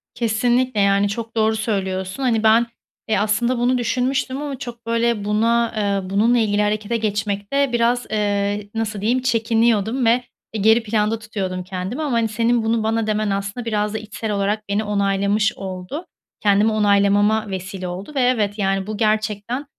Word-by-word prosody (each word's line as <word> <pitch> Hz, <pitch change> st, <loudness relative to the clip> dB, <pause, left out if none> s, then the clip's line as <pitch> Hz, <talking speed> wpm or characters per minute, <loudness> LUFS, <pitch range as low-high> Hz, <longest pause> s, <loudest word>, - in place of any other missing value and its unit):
Kesinlikle, 240 Hz, +1 st, +1 dB
yani 200 Hz, 0 st, +3 dB
çok 230 Hz, +2 st, -5 dB
doğru 220 Hz, 0 st, +2 dB
söylüyorsun. 190 Hz, +1 st, -2 dB
Hani, 225 Hz, -3 st, +1 dB
ben, 225 Hz, +2 st, +5 dB, 0.4 s
eee, 220 Hz, -, +1 dB
aslında 215 Hz, +5 st, +1 dB
bunu 250 Hz, +1 st, +2 dB
düşünmüştüm 260 Hz, +3 st, -1 dB
ama 285 Hz, -2 st, -4 dB
çok, 240 Hz, -3 st, -8 dB
böyle, 230 Hz, -2 st, 0 dB
buna, 230 Hz, +3 st, +1 dB
eee, 200 Hz, -3 st, -1 dB
bununla 225 Hz, +5 st, +3 dB
ilgili 210 Hz, -2 st, +1 dB
harekete 210 Hz, +2 st, 0 dB
geçmekte 210 Hz, +5 st, -1 dB
biraz, 240 Hz, +1 st, +2 dB
eee, 205 Hz, -1 st, -1 dB
nasıl 215 Hz, -2 st, -2 dB
diyeyim, 240 Hz, +5 st, +1 dB
çekiniyordum 230 Hz, 0 st, +1 dB
ve, 240 Hz, +2 st, +3 dB, 0.3 s
eee, 215 Hz, -, -2 dB
geri 220 Hz, +2 st, +4 dB
planda 215 Hz, 0 st, 0 dB
tutuyordum 190 Hz, -4 st, -4 dB
kendimi 185 Hz, -, -5 dB
ama, 295 Hz, -4 st, -2 dB
hani, 230 Hz, -1 st, +2 dB
senin 230 Hz, +2 st, +1 dB
bunu 225 Hz, 0 st, +1 dB
bana 225 Hz, 0 st, 0 dB
demen 215 Hz, 0 st, 0 dB
aslında 200 Hz, +4 st, -3 dB
biraz 210 Hz, -2 st, -1 dB
da -, -, -1 dB
içsel 215 Hz, 0 st, -5 dB
olarak 205 Hz, +1 st, -1 dB
beni 205 Hz, +2 st, 0 dB
onaylamış 200 Hz, +2 st, +1 dB
oldu. 190 Hz, -, -6 dB, 0.4 s
Kendimi 205 Hz, +1 st, +3 dB
onaylamama 205 Hz, +1 st, +3 dB
vesile 185 Hz, 0 st, -5 dB
oldu 185 Hz, +9 st, -6 dB
ve 270 Hz, -, +2 dB
evet, 225 Hz, -5 st, +1 dB
yani, 195 Hz, 0 st, 0 dB
bu 215 Hz, -, -4 dB
gerçekten 215 Hz, +4 st, -1 dB
215 Hz, 165 wpm, -21 LUFS, 200-235 Hz, 0.4 s, ben